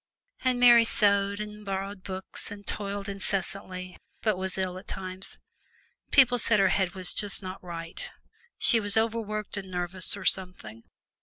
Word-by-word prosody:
And 255 Hz, -1 st, +2 dB
Mary 240 Hz, -1 st, +8 dB
sewed 200 Hz, -2 st, +3 dB
and 210 Hz, 0 st, -6 dB
borrowed 195 Hz, 0 st, -4 dB
books 190 Hz, 0 st, -3 dB
and 205 Hz, -1 st, -9 dB
toiled 200 Hz, -1 st, -3 dB
incessantly, 190 Hz, -2 st, -4 dB, 0.3 s
but 215 Hz, -3 st, +2 dB
was 190 Hz, 0 st, -3 dB
ill 185 Hz, -1 st, -2 dB
at -, -, -16 dB
times. 185 Hz, 0 st, -4 dB, 0.7 s
People 250 Hz, -3 st, +5 dB
said 215 Hz, -2 st, +3 dB
her 195 Hz, -1 st, +5 dB
head 190 Hz, -2 st, +1 dB
was 185 Hz, -1 st, -2 dB
not -, -, 0 dB
just 205 Hz, -1 st, -1 dB, 0.2 s
right 165 Hz, -2 st, -6 dB, 0.5 s
she 235 Hz, -, +4 dB
was 205 Hz, 0 st, +1 dB
overworked 215 Hz, -2 st, -1 dB
and 190 Hz, -1 st, -5 dB
nervous 180 Hz, +1 st, -2 dB
or 190 Hz, -, -8 dB
something! 115 Hz, -, -1 dB
195 Hz, 155 wpm, -28 LUFS, 185-210 Hz, 0.7 s, Mary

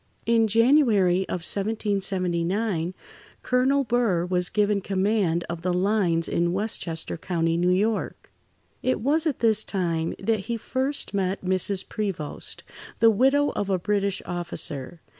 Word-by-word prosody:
In 225 Hz, 0 st, +3 dB
January 220 Hz, -6 st, +3 dB
of 180 Hz, -, -3 dB
1779, 195 Hz, -3 st, -1 dB, 0.5 s
Colonel 265 Hz, +3 st, +2 dB
Burr 230 Hz, -8 st, +1 dB
was 180 Hz, 0 st, 0 dB
given 210 Hz, -1 st, +1 dB
command 190 Hz, -3 st, 0 dB
of 170 Hz, -1 st, -5 dB
the 180 Hz, +1 st, -1 dB
"lines" 180 Hz, -3 st, +1 dB
in 170 Hz, 0 st, 0 dB
Westchester 185 Hz, -6 st, -2 dB
County, 165 Hz, -1 st, -1 dB
New 175 Hz, +1 st, +1 dB
York. 205 Hz, +4 st, -1 dB, 0.5 s
It 255 Hz, -, 0 dB
was 305 Hz, +6 st, +1 dB
at 295 Hz, -, -2 dB
this 220 Hz, -2 st, +4 dB
time 165 Hz, -4 st, -2 dB
that 220 Hz, +2 st, 0 dB
he 230 Hz, +4 st, -4 dB
first 265 Hz, +4 st, -2 dB
met 190 Hz, -1 st, -1 dB
Mrs. 190 Hz, +1 st, +1 dB
Prevost, 195 Hz, -9 st, -4 dB, 0.3 s
the 225 Hz, -1 st, +5 dB
widow 270 Hz, +6 st, +3 dB
of 200 Hz, -, -3 dB
a 190 Hz, -, +2 dB
British 200 Hz, +1 st, -1 dB
officer. 170 Hz, -3 st, -4 dB
195 Hz, 135 wpm, -25 LUFS, 175-225 Hz, 0.5 s, the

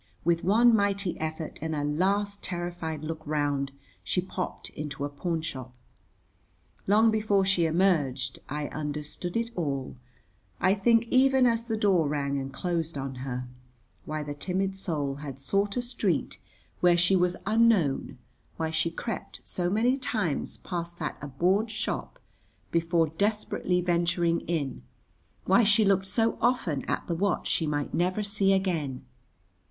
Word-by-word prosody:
With 170 Hz, 0 st, +2 dB
one 230 Hz, +5 st, +5 dB
mighty 200 Hz, -3 st, +1 dB
effort 160 Hz, 0 st, -4 dB
and 160 Hz, 0 st, -2 dB
a 145 Hz, -, -1 dB
last 200 Hz, +7 st, 0 dB
terrified 175 Hz, -3 st, -4 dB
look 160 Hz, 0 st, -4 dB
round, 145 Hz, -2 st, 0 dB, 0.3 s
she 95 Hz, -, 0 dB
popped 185 Hz, 0 st, -4 dB
into 145 Hz, -1 st, -4 dB
a -, -, -3 dB
pawnshop. 145 Hz, -4 st, -4 dB, 1.2 s
Long 220 Hz, +3 st, +5 dB
before 210 Hz, -3 st, +2 dB
she 180 Hz, -3 st, +3 dB
emerged 160 Hz, -7 st, +1 dB
I 150 Hz, +1 st, -2 dB
understood 150 Hz, +5 st, -4 dB
it 230 Hz, 0 st, -1 dB
all, 140 Hz, -7 st, -2 dB, 0.6 s
I 185 Hz, -, +4 dB
think 230 Hz, +3 st, +4 dB
even 265 Hz, 0 st, +5 dB
as 230 Hz, -1 st, +2 dB
the 225 Hz, -2 st, -1 dB
door 190 Hz, -7 st, +3 dB
rang 140 Hz, -1 st, -1 dB
and 135 Hz, 0 st, -5 dB
closed 165 Hz, -2 st, -2 dB
on 135 Hz, 0 st, -4 dB
her; 125 Hz, -1 st, -4 dB, 0.6 s
why 155 Hz, 0 st, -3 dB
the 145 Hz, 0 st, -5 dB
timid 190 Hz, +5 st, -2 dB
soul 150 Hz, -7 st, -2 dB
had 140 Hz, -2 st, -7 dB
sought 200 Hz, -, 0 dB
a 245 Hz, -, 0 dB
street 245 Hz, -, -1 dB, 0.4 s
where 175 Hz, -1 st, +5 dB
she 175 Hz, +3 st, +4 dB
was 180 Hz, -1 st, +2 dB
unknown, 215 Hz, -9 st, +2 dB, 0.4 s
why 160 Hz, -1 st, -1 dB
she 160 Hz, +1 st, +1 dB
crept 190 Hz, +5 st, -6 dB
so 175 Hz, -1 st, -1 dB
many 235 Hz, +7 st, +2 dB
times 210 Hz, -, -2 dB
past 170 Hz, -1 st, -5 dB
that 155 Hz, -3 st, -3 dB
abhorred 180 Hz, -, +1 dB
shop 215 Hz, 0 st, -3 dB, 0.5 s
before 165 Hz, -1 st, +2 dB
desperately 185 Hz, 0 st, 0 dB
venturing 170 Hz, -1 st, +1 dB
in, 145 Hz, -, -2 dB, 0.6 s
why 195 Hz, +6 st, +5 dB
she 210 Hz, +1 st, +5 dB
looked 195 Hz, -1 st, +2 dB
so 225 Hz, +4 st, +1 dB
often 230 Hz, -, +1 dB
at -, -, -1 dB
the 175 Hz, -, -2 dB
watch 190 Hz, +2 st, 0 dB
she 160 Hz, -, 0 dB
might 145 Hz, -1 st, -2 dB
never 185 Hz, +4 st, +1 dB
see 200 Hz, -1 st, +2 dB
again. 165 Hz, -9 st, 0 dB
175 Hz, 145 wpm, -28 LUFS, 150-200 Hz, 1.2 s, one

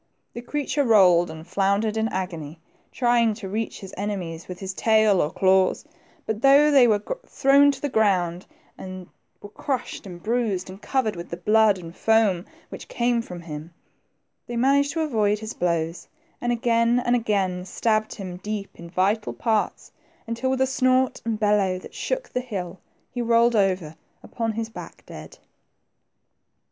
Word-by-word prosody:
The 235 Hz, -, -6 dB
creature 290 Hz, +3 st, -1 dB
rolled 185 Hz, -8 st, +5 dB
and 160 Hz, 0 st, -9 dB
floundered 200 Hz, +4 st, 0 dB
in 220 Hz, 0 st, 0 dB
agony, 170 Hz, -6 st, -5 dB, 0.3 s
trying 240 Hz, -3 st, +2 dB
to 205 Hz, -3 st, -7 dB
reach 215 Hz, +3 st, -4 dB
his 190 Hz, -1 st, -10 dB
ene 205 Hz, 0 st, -2 dB
mies 165 Hz, -1 st, -7 dB
with 180 Hz, -, -7 dB
his 190 Hz, 0 st, -5 dB
tail 215 Hz, -2 st, +3 dB
or 150 Hz, -, 0 dB
claws, 190 Hz, -, +2 dB, 0.4 s
but 220 Hz, 0 st, -3 dB
though 280 Hz, +3 st, +6 dB
they 265 Hz, -4 st, +6 dB
were 210 Hz, -2 st, +2 dB, 0.2 s
thrown 280 Hz, +1 st, +4 dB
to 280 Hz, -, -2 dB
the 290 Hz, -, -2 dB
ground, 185 Hz, -7 st, +1 dB, 0.3 s
and 185 Hz, -1 st, -8 dB, 0.4 s
were 205 Hz, -, -9 dB
crushed, 250 Hz, -1 st, -4 dB
and 175 Hz, -2 st, -10 dB
bruised, 215 Hz, -5 st, -1 dB
and 190 Hz, +2 st, -12 dB
covered 255 Hz, -7 st, -1 dB
with 170 Hz, 0 st, -8 dB
the 170 Hz, -, -5 dB
blood 210 Hz, +2 st, +3 dB
and 170 Hz, -1 st, -10 dB
foam 220 Hz, -6 st, +2 dB, 0.2 s
which -, -, -9 dB
came 240 Hz, 0 st, 0 dB
from 180 Hz, -6 st, -9 dB
him, 160 Hz, 0 st, -9 dB, 0.7 s
they 240 Hz, -, -4 dB
managed 280 Hz, +3 st, +2 dB
to 325 Hz, -, -1 dB
avoid 215 Hz, -9 st, +1 dB
his 220 Hz, +1 st, -7 dB
blows, 170 Hz, -1 st, -2 dB, 0.3 s
and 240 Hz, -, 0 dB
again 235 Hz, 0 st, +2 dB
and 240 Hz, -, +3 dB
again 195 Hz, -6 st, 0 dB
scabbed 215 Hz, +3 st, -1 dB
him 185 Hz, -3 st, -7 dB
deep 205 Hz, +1 st, -5 dB
in 170 Hz, 0 st, -9 dB
vital 195 Hz, +5 st, 0 dB
parts, 220 Hz, -3 st, -1 dB, 0.3 s
until 230 Hz, +3 st, -2 dB
with 260 Hz, 0 st, 0 dB
a -, -, +5 dB
snort 255 Hz, -1 st, +1 dB
and 225 Hz, -2 st, -2 dB
bellow 205 Hz, -3 st, +2 dB
that 185 Hz, -, -12 dB
shook -, -, -3 dB
the 250 Hz, -, -3 dB
hill, 190 Hz, -7 st, -6 dB, 0.3 s
he 245 Hz, -, -3 dB
rolled 235 Hz, 0 st, +3 dB
over 185 Hz, -6 st, 0 dB, 0.3 s
upon 225 Hz, -2 st, -3 dB
his 225 Hz, +1 st, -3 dB
back 225 Hz, -, -11 dB
dead. -, -, -11 dB
215 Hz, 170 wpm, -24 LUFS, 185-240 Hz, 0.7 s, though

